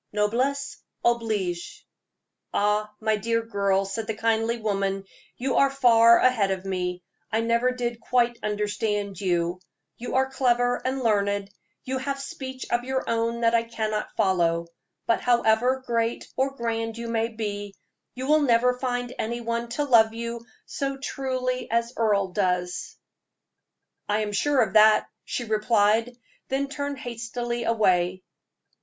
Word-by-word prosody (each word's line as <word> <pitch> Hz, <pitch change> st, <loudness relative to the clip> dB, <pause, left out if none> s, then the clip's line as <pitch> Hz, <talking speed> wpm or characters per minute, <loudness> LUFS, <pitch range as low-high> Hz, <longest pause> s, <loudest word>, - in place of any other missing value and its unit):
Noblesse 250 Hz, +7 st, 0 dB, 0.3 s
oblige!" 215 Hz, -7 st, -1 dB, 0.6 s
"Ah, 210 Hz, +1 st, +1 dB
my 220 Hz, -1 st, +1 dB
dear," 230 Hz, +2 st, -1 dB, 0.4 s
said 215 Hz, +3 st, -4 dB
the 220 Hz, -, -2 dB
kindly 225 Hz, +1 st, +1 dB
woman, 195 Hz, -3 st, -1 dB, 0.3 s
"you 260 Hz, +1 st, -1 dB
are 275 Hz, -, +5 dB
far 235 Hz, -4 st, +6 dB
ahead 230 Hz, -6 st, +3 dB
of 190 Hz, 0 st, -3 dB
me 180 Hz, -1 st, -3 dB, 0.3 s
I 220 Hz, +1 st, +1 dB
never 235 Hz, +2 st, +2 dB
did 240 Hz, -2 st, -3 dB
quite 240 Hz, -1 st, +1 dB
understand 205 Hz, -2 st, -2 dB
you 175 Hz, -1 st, 0 dB, 0.4 s
you 245 Hz, -, -5 dB
are 265 Hz, 0 st, +3 dB
clever 245 Hz, -2 st, +2 dB
and 260 Hz, 0 st, -2 dB
learned; 200 Hz, -2 st, +1 dB, 0.3 s
you 260 Hz, 0 st, -2 dB
have 275 Hz, +1 st, -3 dB
speech 260 Hz, -1 st, -6 dB
of 240 Hz, 0 st, +1 dB
your 260 Hz, +1 st, -2 dB
own 230 Hz, +1 st, 0 dB
that 230 Hz, 0 st, +3 dB
I 230 Hz, -, +4 dB
cannot 220 Hz, -2 st, -3 dB
follow: 170 Hz, -5 st, +2 dB, 0.4 s
but 230 Hz, -, +2 dB
however 245 Hz, +2 st, +2 dB
great 230 Hz, -1 st, -1 dB
or 270 Hz, +1 st, 0 dB
grand 225 Hz, -2 st, -2 dB
you 235 Hz, 0 st, -5 dB
may 225 Hz, -1 st, 0 dB
be, 205 Hz, -3 st, -5 dB, 0.4 s
you 255 Hz, +1 st, -4 dB
will 305 Hz, +2 st, +4 dB
never 250 Hz, -1 st, +3 dB
find 245 Hz, -1 st, -2 dB
any 235 Hz, +2 st, -2 dB
one 235 Hz, 0 st, -3 dB
to 295 Hz, -, +2 dB
love 225 Hz, -5 st, +4 dB
you 235 Hz, 0 st, -5 dB, 0.2 s
so 275 Hz, -1 st, -3 dB
truly 255 Hz, -2 st, -3 dB
as 235 Hz, +1 st, 0 dB
Earle 205 Hz, -4 st, +2 dB
does." 180 Hz, -2 st, -1 dB, 1.1 s
"I 210 Hz, +1 st, +2 dB
am 210 Hz, -1 st, -2 dB
sure 275 Hz, +6 st, +2 dB
of 215 Hz, -, -4 dB
that," 215 Hz, 0 st, +6 dB, 0.2 s
she 245 Hz, -, -3 dB
replied, 220 Hz, +1 st, +2 dB, 0.3 s
then 275 Hz, +1 st, -1 dB
turned 285 Hz, 0 st, -4 dB
hastily 240 Hz, 0 st, -4 dB
away. 185 Hz, -5 st, +2 dB
230 Hz, 145 wpm, -25 LUFS, 210-250 Hz, 1.1 s, far